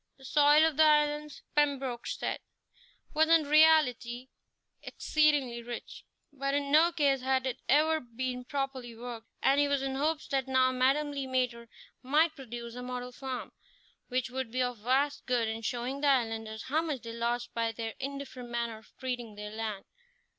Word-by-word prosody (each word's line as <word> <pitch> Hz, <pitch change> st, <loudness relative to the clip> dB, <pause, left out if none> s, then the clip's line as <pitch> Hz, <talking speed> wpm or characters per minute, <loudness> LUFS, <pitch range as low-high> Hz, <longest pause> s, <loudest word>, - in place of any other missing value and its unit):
The 265 Hz, -, -15 dB
soil 295 Hz, +3 st, +5 dB
of 320 Hz, -3 st, 0 dB
the 315 Hz, -, +7 dB
islands, 300 Hz, -1 st, +2 dB
Pembroke 275 Hz, -5 st, 0 dB
said, -, -, -3 dB, 0.7 s
was 315 Hz, +1 st, +3 dB
in 330 Hz, -1 st, +6 dB
reality 285 Hz, -5 st, +4 dB, 0.5 s
exceedingly 290 Hz, -6 st, +1 dB
rich, 240 Hz, 0 st, -8 dB, 0.3 s
but 275 Hz, 0 st, -1 dB
in 285 Hz, -1 st, -1 dB
no 320 Hz, +3 st, +6 dB
case 285 Hz, -5 st, +2 dB
had 260 Hz, 0 st, +1 dB
it 260 Hz, -, -3 dB
ever 315 Hz, +3 st, +4 dB
been 250 Hz, 0 st, -5 dB
properly 270 Hz, -4 st, -4 dB
worked, 235 Hz, -1 st, -7 dB, 0.2 s
and 275 Hz, +1 st, +4 dB
he 290 Hz, -, +4 dB
was 280 Hz, -1 st, 0 dB
in 270 Hz, 0 st, -2 dB
hopes 305 Hz, +3 st, -1 dB
that 270 Hz, -2 st, 0 dB
now 260 Hz, -1 st, +3 dB
Madame 270 Hz, +4 st, +2 dB
Le 275 Hz, -2 st, -4 dB
Maître 250 Hz, -2 st, -1 dB, 0.3 s
might 305 Hz, +5 st, +2 dB
produce 240 Hz, -3 st, -8 dB
a 250 Hz, -, -7 dB
model 250 Hz, 0 st, -5 dB
farm, 260 Hz, 0 st, -6 dB, 0.6 s
which 255 Hz, -1 st, -2 dB
would 260 Hz, -2 st, -3 dB
be 255 Hz, +1 st, +1 dB
of 245 Hz, -2 st, -3 dB
vast 270 Hz, +6 st, 0 dB
good 245 Hz, -3 st, +1 dB
in 220 Hz, +1 st, -3 dB
showing 245 Hz, +4 st, -3 dB
the 295 Hz, -, +2 dB
islanders 225 Hz, -4 st, 0 dB
how 310 Hz, +4 st, +1 dB
much 305 Hz, -6 st, -4 dB
they 230 Hz, -1 st, -6 dB
lost 235 Hz, +1 st, -2 dB
by 230 Hz, -1 st, 0 dB
their 225 Hz, 0 st, -5 dB
indifferent 270 Hz, -3 st, -6 dB
manner 235 Hz, -2 st, -3 dB
of 220 Hz, -, -22 dB
treating 245 Hz, -4 st, -4 dB
their 210 Hz, 0 st, -7 dB
land. 215 Hz, -2 st, -4 dB
260 Hz, 175 wpm, -30 LUFS, 240-290 Hz, 0.7 s, the